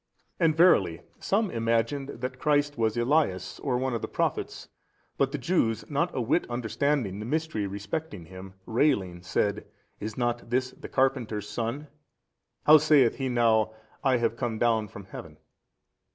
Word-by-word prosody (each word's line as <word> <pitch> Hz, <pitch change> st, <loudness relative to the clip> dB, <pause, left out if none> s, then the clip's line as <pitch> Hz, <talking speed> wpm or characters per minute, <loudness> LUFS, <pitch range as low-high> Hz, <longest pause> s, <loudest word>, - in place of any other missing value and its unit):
And 160 Hz, -3 st, +3 dB
verily 95 Hz, -, +4 dB, 0.2 s
some 205 Hz, 0 st, 0 dB
imagined 115 Hz, +5 st, 0 dB
that 130 Hz, 0 st, -5 dB
Christ 145 Hz, 0 st, +2 dB
was 115 Hz, -1 st, 0 dB
Elias 120 Hz, -, +1 dB
or 130 Hz, -3 st, -1 dB
one 130 Hz, 0 st, -1 dB
of 115 Hz, -, -2 dB
the -, -, -3 dB
Prophets, -, -, -2 dB, 0.5 s
but 135 Hz, -1 st, +1 dB
the 150 Hz, -, -2 dB
Jews, 120 Hz, -6 st, 0 dB
not 165 Hz, +5 st, +1 dB
a -, -, 0 dB
whit 125 Hz, +8 st, 0 dB
understanding 120 Hz, -2 st, -1 dB
the 105 Hz, -, -5 dB
mystery 155 Hz, -8 st, -1 dB
respecting 100 Hz, -, -5 dB
Him, 95 Hz, +2 st, -11 dB
railing 105 Hz, -9 st, +1 dB
said, 100 Hz, +3 st, -1 dB, 0.3 s
Is 110 Hz, +1 st, -6 dB
not 120 Hz, -1 st, -1 dB
this 130 Hz, +1 st, 0 dB
the -, -, -11 dB
carpenter's 120 Hz, -6 st, 0 dB
son 115 Hz, +6 st, -3 dB
56? 150 Hz, 0 st, -18 dB, 0.7 s
how 155 Hz, +1 st, +9 dB
saith 145 Hz, -5 st, +4 dB
He 135 Hz, -1 st, -2 dB
now, 110 Hz, -3 st, +2 dB, 0.3 s
I 130 Hz, -3 st, +3 dB
have 115 Hz, -1 st, 0 dB
come 115 Hz, -3 st, -2 dB
down 110 Hz, -2 st, +2 dB
from 100 Hz, -1 st, -11 dB
heaven? 80 Hz, -5 st, -10 dB
120 Hz, 160 wpm, -27 LUFS, 110-145 Hz, 0.7 s, how